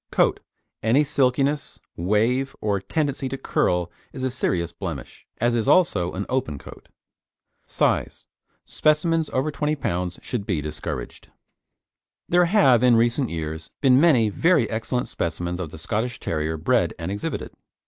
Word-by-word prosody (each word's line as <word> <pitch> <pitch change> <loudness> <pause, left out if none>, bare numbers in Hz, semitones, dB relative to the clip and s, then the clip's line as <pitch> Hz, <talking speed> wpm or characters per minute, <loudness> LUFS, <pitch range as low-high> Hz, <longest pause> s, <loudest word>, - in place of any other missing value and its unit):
COAT - - +2 0.4
Any 120 +7 +4
silkiness, 140 0 0 0.2
wave 115 +9 +1
or 100 -2 0
tendency 140 +4 -2
to 135 - -4
curl 90 -8 0 0.2
is 130 - -6
a 130 - 0
serious 85 -9 -1
blemish, 85 -9 -7
as 120 +1 +1
is 115 -2 0
also 100 - +3
an 100 +2 -3
open 125 - -1
coat. - - -13 0.8
SIZE - - 0 0.4
Specimens 160 +1 +1
of - - -9
over 135 +4 +1
20 150 +1 -1
lb. 90 - -3
should 110 -5 -4
be 90 -6 0
discouraged. 75 +1 -6 1.0
There 175 0 +4
have, 165 - +5
of 125 -1 +5
recent 120 +3 +2
years, 80 0 -5
been 130 -1 +5
many 130 -10 +5
very 160 - +3
excellent 115 +3 -2
specimens 85 +1 -3
of 85 -4 -4
the 80 - -10
Scottish 110 +9 -2
Terrier 80 0 -2
bred 75 - +1
and 85 +3 -4
exhibited. 100 +1 -4
115 Hz, 150 wpm, -24 LUFS, 90-135 Hz, 1.0 s, have